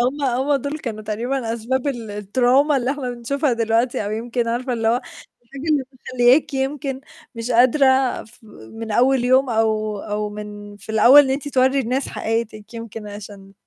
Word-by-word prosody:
هُم 285 +3 -3
هُم 265 +3 +1
دول 285 +3 -4
كانوا 220 -6 -6
تقريبًا 230 +3 -2
أسباب 250 +4 -2
ال 240 -6 -3
التروما 245 +8 +2
اللي 255 0 0
إحنا 275 -3 -3
بنشوفها 255 +4 -1
دلوقتي 230 0 0
أو 205 - -3
يمكن 235 +2 -2
عارفة 250 +2 -2
اللي 225 -2 0
هو 230 - +3 0.5
الحاجة 270 +3 -11
اللي 290 -3 +2
مخلّياكِ 255 +2 +2
يمكن 270 0 -2 0.3
مش 230 +1 -5
قادرة 255 +4 +4 0.4
ف 225 - -15 0.3
من 225 0 -7
أول 255 +2 +3
يوم 260 +1 +3
أو 215 -2 0
أو 210 +1 -3
من 205 0 -9
في 205 +2 -8
الأول 250 +7 +8
إن 265 - -2
أنتِ 280 +2 -2
تورّي 265 0 +2
الناس 260 +2 -2
حقيقتِك 225 -1 -4
يمكن 225 -2 -7
عشان 200 -1 -10
240 Hz, 170 wpm, -21 LUFS, 220-265 Hz, 0.5 s, الأول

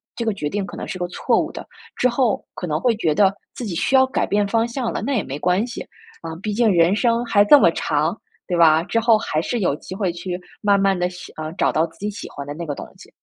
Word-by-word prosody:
这 235 - -3
个 220 - +1
决 150 -7 -3
定 200 +4 -2
可 - - -9
能 - - -6
是 - - -5
个 180 -1 -2
错 - - +1
误 - - -2
的， - - -7 0.3
之 250 - +2
后， 240 -2 +1
可 - - -5
能 155 -1 -1
会 235 +4 +2
觉 160 -8 0
得 195 +1 +4 0.2
自 245 - -5
己 200 - -4
需 270 - +1
要 265 0 +6
改 260 - -1
变 205 0 +1
方 225 +2 +1
向 240 0 -3
了， - - -3
那 280 - -1
也 215 - 0
没 135 +2 -6
关 180 +6 +1
系， 240 -1 -7 0.4
啊， 165 -1 -6
毕 210 0 -2
竟 225 0 +3
人 175 +1 +4
生 235 +2 +1
还 205 -3 +4
这 290 - +8
么 170 - +5
长， 155 +2 0 0.3
对 180 - -1
吧？ 160 -1 +5
之 230 +5 0
后 230 -1 +4
还 155 -7 -1
是 240 +8 -2
有 175 -8 +1
机 185 - -9
会 190 -3 -1
去 175 +1 -5 0.2
慢 200 -1 +3
慢 195 -1 +2
地 180 0 0
喜 180 0 -11
呃， 155 0 -6
找 - - +2
到 160 - +2
自 165 0 -22
己 210 - -2
喜 205 - -8
欢 140 - -8
的 145 - -6
那 170 +3 -6
个 145 -3 -4
东 - - -7
西。 - - -15
195 Hz, 305 characters per minute, -21 LUFS, 165-225 Hz, 0.4 s, 这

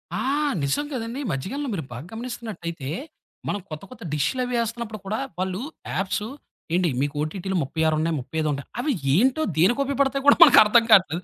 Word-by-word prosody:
ఆ! - - -2 0.4
నిజం 140 - 0
గదండీ! 245 +2 -4
మధ్యకాలంలో 255 - -3
మీరు 165 - -3
బాగ 120 +4 -7
గమనిస్తున్నట్టయితే, 220 - -6 0.6
మనం 205 - -1
కొత్త, 155 +1 -7
కొత్త 255 - -11
డిష్‌ల‌వి 250 - 0
ఏస్తున్నప్పుడు 230 -2 -4
కూడా 215 +3 -2 0.2
వాళ్ళు 185 +2 -2 0.3
యాప్సు, 200 +3 -1 0.5
ఏండి 180 -1 +2
మీకు 145 +1 -1
ఓటిటి‌లు 190 +4 -2
36 160 +2 0
ఉన్నాయి, 165 +1 0
35 155 +4 -2
ఉంటాయి. 140 0 -6
అవి 295 0 0 0.2
ఏంటో, 260 - +3
దేనికుపయోగా 265 - +2
పడతాయొ 275 0 +1
కూడా - - +8
మనకర్థం 230 -6 +7
కాట్లేదు. 180 -3 +4
195 Hz, 155 wpm, -24 LUFS, 160-245 Hz, 0.6 s, కూడా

